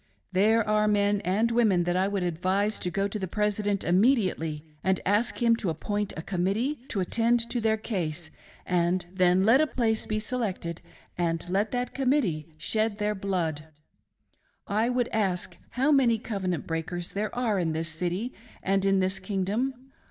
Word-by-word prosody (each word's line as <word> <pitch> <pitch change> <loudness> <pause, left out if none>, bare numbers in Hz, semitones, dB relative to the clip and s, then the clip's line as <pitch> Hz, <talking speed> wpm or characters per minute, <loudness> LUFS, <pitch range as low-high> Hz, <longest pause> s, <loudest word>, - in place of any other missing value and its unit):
" 100 +2 -44
There 215 +4 +3
are 215 0 +3
men 205 -1 +2
and 215 +6 +1
women 215 -7 +3
that 175 +1 0
I 185 +1 +2
would 200 -2 -1
advise 185 +5 0
to 180 - -2
go 195 +3 0
to 210 +1 -5
the 190 - -3
President 205 0 0
imme 205 +11 +4
diately, 160 -7 -2 0.2
and 190 -1 +2
ask 210 +5 +1
him 230 -1 +5
to 200 - -2
appoint 205 +6 -2
a 160 - -5
committee 200 - -1
to 200 - -2
attend 230 +5 +1
to 240 - -1
their 220 0 +2
case; 175 -7 -4 0.3
and 175 0 +1
then 185 0 +4
let 245 +6 +6
a 310 - +3
place 225 -5 0
be 215 - -1
selected, 210 -7 -3 0.4
and 165 0 -1
let 195 +4 +1
that 245 0 -2
committee 250 - +1
shed 215 +6 -1
their 210 0 0
blood..., 175 -6 -2 0.5
< - - -44 0.2
"I 220 +3 +1
would 245 -1 +1
ask 185 -4 -1
how 270 +4 +1
many 255 -5 +4
covenant 190 - -3
breakers 170 +2 -4
there 210 +3 -3
are 230 -5 +1
in 165 -3 0
this 160 +1 -2
city 180 +9 -3 0.3
and 195 0 +1
in 195 -1 +3
this 190 +1 0
kingdom? 225 +7 -2
200 Hz, 180 wpm, -27 LUFS, 180-225 Hz, 0.5 s, let